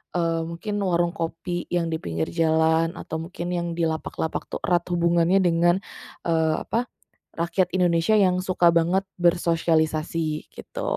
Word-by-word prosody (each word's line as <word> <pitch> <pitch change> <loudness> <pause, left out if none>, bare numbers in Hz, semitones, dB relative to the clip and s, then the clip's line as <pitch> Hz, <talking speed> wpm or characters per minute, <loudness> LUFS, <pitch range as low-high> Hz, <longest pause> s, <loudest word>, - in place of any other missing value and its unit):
eee, 165 -1 +1
mungkin 205 +5 -4
warung 175 -3 +1
kopi 175 0 -4
yang 170 -2 -1
di 160 - -2
pinggir 80 - -3
jalan 160 0 +2
atau 160 - -5
mungkin 175 0 -5
yang 170 -1 -2
di 170 - -1
lapak-lapak 160 0 -2
tuh - - -6
erat 175 -1 +1
hubungannya 170 +2 +2
dengan, 175 0 +3 0.5
eee, 160 -2 +2
apa, 235 +2 -1 0.5
rakyat 175 +2 0
Indonesia 175 +3 +3
yang 185 -3 +3
suka 185 -2 +3
banget 170 +3 +2 0.2
bersosialisasi 165 -2 +1
gitu. - - -7
170 Hz, 140 wpm, -24 LUFS, 165-175 Hz, 0.5 s, dengan